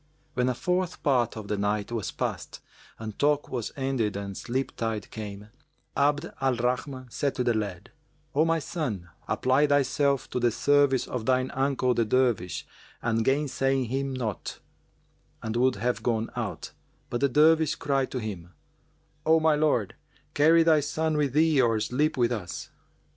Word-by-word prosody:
When 125 -1 +1
a 125 - -1
fourth 180 +7 -1
part 125 -6 +2
of 105 -2 -7
the 105 -1 -2
night 105 +1 -1
was 115 -6 -2
past - - -4 0.4
and 110 -2 -7
talk 145 0 +2
was 120 -4 -3
ended 130 -7 -1
and 100 -1 -5
sleep 130 +6 -3
tide 110 -2 -3
came, 105 -1 -7 0.5
Abd 145 +3 +1
al 135 -1 +2
Rahman 125 +1 -2
said 140 +2 -1
to 125 - 0
the 120 -1 +2
lad, 105 -5 -4 0.4
"O 150 - +4
my 165 0 +2
son, 125 - -4 0.2
apply 130 +3 +2
thyself 140 -1 +2
to - - -1
the 120 -1 +3
service 140 +2 +3
of 120 -3 -4
thine 130 0 +2
uncle 135 -2 +1
the 120 - +2
Dervish 115 -6 +1 0.4
and 115 -1 +1
gainsay 135 0 +1
him 135 +3 -2
not:" 115 -7 -4 0.9
and 110 0 -3
would 130 +2 +3
have 120 +4 -1
gone 115 -2 -1
out; - - -4 0.4
but 120 - -2
the 140 - +3
Dervish 155 +3 +4
cried 135 -2 0
to 130 - -3
him, 90 -6 -6 0.7
"O 160 +1 +5
my 160 0 +4
lord, 150 -9 +1 0.4
carry 165 +3 +5
thy 160 -2 +5
son 155 +2 -1
with 145 -4 +1
thee 155 -2 +4
or 115 -3 +2
sleep 140 +8 0
with 120 -1 +2
us." 100 -7 -5
130 Hz, 165 wpm, -27 LUFS, 115-145 Hz, 0.9 s, O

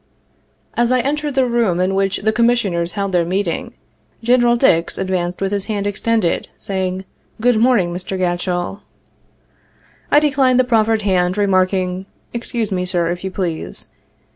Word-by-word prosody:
" - - -41 0.3
As 240 +1 +1
I 255 - +3
entered 295 +1 -2
the 265 -1 +3
room 235 -7 +1
in 185 +1 +1
which 195 0 +1
the 220 +1 +2
Commissioners 215 -7 +1
held 200 -2 -2
their 175 -2 +2
meeting, 180 +1 -2 0.5
Genl. 240 0 +4
Dix 170 -10 +2
advanced 180 -2 -2
with 195 0 -1
his 200 -1 -1
hand 205 -2 -2
extended, 205 -2 0
saying, 190 -1 -3 0.3
'good 240 0 +3
morning, 220 -8 +3
Mr. 185 +2 -4
Gatchell.' 175 +1 -1 1.3
I 295 - +6
declined 265 -4 +3
the - - +5
proffered 225 -3 +2
hand, 185 -1 +1
remarking, 185 -1 +1 0.3
'excuse 235 -2 -3
mc, 180 -1 -1
Sir, 175 -2 0
if 175 +1 -5
you 190 - -2
please.' 170 - -4
195 Hz, 155 wpm, -18 LUFS, 180-235 Hz, 1.3 s, I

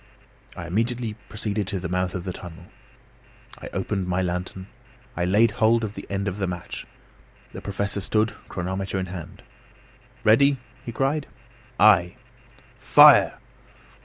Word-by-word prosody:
I 85 - -6
immediately 115 +5 -1 0.2
proceeded 105 -2 -3
to 95 0 -2
the 90 - -4
mouth 90 0 -1
of 90 - -4
the 90 - -4
tunnel. 85 -3 -10 1.0
I - - -8
opened 95 -3 -2
my 90 0 0
lantern. 90 +1 -4 0.5
I 85 - 0
laid 105 +5 +4
hold 115 +2 +2
of 105 -2 -3
the - - -9
end 100 0 -2
of 95 +1 -3
the 95 - 0
match. 90 -1 -6 0.7
The - - -7
Professor 100 0 -3
stood, 110 +2 0 0.2
chronometer 95 +2 -3
in 95 - -1
hand. 90 -3 -9 0.8
"Ready?" 140 +6 +5 0.3
he 120 - -6
cried. 135 +5 -1 0.5
"Ay." 95 -4 +5 0.6
"Fire!" - - +7
95 Hz, 140 wpm, -24 LUFS, 90-110 Hz, 1.0 s, Fire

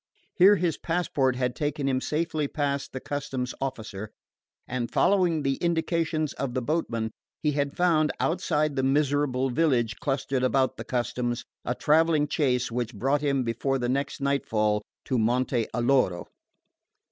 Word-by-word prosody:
Here 195 +3 +7
his 175 -4 -1
passport 150 -7 0
had 125 -1 -1
taken 145 -1 -2
him 130 -1 +1
safely 155 0 -1
past 140 -1 -2
the 130 - -5
customs 130 -3 -3
officer, 110 -6 -4 0.6
and 125 -1 -2
following 180 -6 +2
the 135 -1 0
indications 165 -2 0
of 135 -2 -4
the 130 - 0
boatman, 115 -7 -1 0.3
he 150 - +3
had 140 -1 -2
found, 160 -4 +3
outside 155 -3 0
the 135 - +1
miserable 135 -1 +1
village 120 -6 +1
clustered 135 -2 -1
about 130 0 +1
the - - -6
customs, 120 0 -2 0.2
a 125 - -1
travelling 155 0 +3
chaise 130 -5 0
which 120 -1 -3
brought 135 +7 +1
him 140 -3 +1
before 120 +3 -1
the 120 -2 -2
next 140 +2 -2
night 140 0 0
fall 105 -1 +1 0.2
to 130 - 0
Monte 120 +1 +1
Alloro. 120 -7 +1
135 Hz, 150 wpm, -27 LUFS, 125-150 Hz, 0.6 s, Here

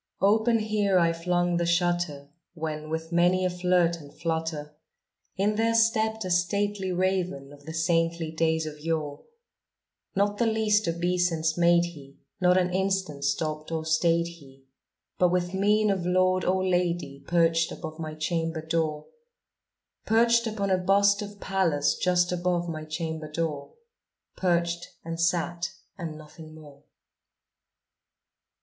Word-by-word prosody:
Open 220 +3 +4
here 210 -3 +1
I 170 -1 +3
flung 175 +1 0
the 170 - 0
shutter, 170 -5 0 0.3
when, 155 -1 -5
with 160 +1 -4
many 175 +2 +3
a 180 - +1
flirt 180 -1 +2
and 145 -1 -13
flutter, 160 -2 -3 0.6
In 210 +2 +1
there 230 +1 +2
stepped 220 -2 +2
a 185 - -3
stately 190 +2 0
raven 180 -6 -1
of 145 +1 -17
the 160 - -5
saintly 165 -1 0
days 160 0 0
of 150 -1 -7
yore. 155 -2 -3 0.9
Not 205 +1 +1
the 235 - +3
least 215 -2 +2
obeisance 170 -1 0
made 170 0 +4
he; 145 -5 -11 0.2
not 180 0 +4
an 180 -1 +1
instant 190 -7 -1
stopped 155 +2 -2
or 160 -1 -2
stayed 165 +1 +2
he; 140 -6 -13 0.6
But, 180 - +4
with 180 0 0
mien 210 +2 +3
of 190 -3 -1
lord 185 +1 +2
or 185 +1 +1
lady, 175 -6 -1
perched 165 -1 +2
above 155 0 -7
my 155 -1 -5
chamber 165 0 -2
door 160 -2 -1 1.0
Perched 235 +1 +4
upon 200 -3 -2
a 185 - +3
bust 200 +2 +3
of 205 0 -8
Pallas 160 -8 +1
just 180 -1 +1
above 175 -1 0
my 155 -2 -5
chamber 160 -1 -5
door 150 -3 -3 0.6
Perched, 170 -1 0 0.2
and 165 0 -5
sat, 170 0 0 0.3
and 165 -4 -6
nothing 155 +1 -13
more. 145 -3 -14
170 Hz, 140 wpm, -27 LUFS, 160-185 Hz, 1.0 s, Open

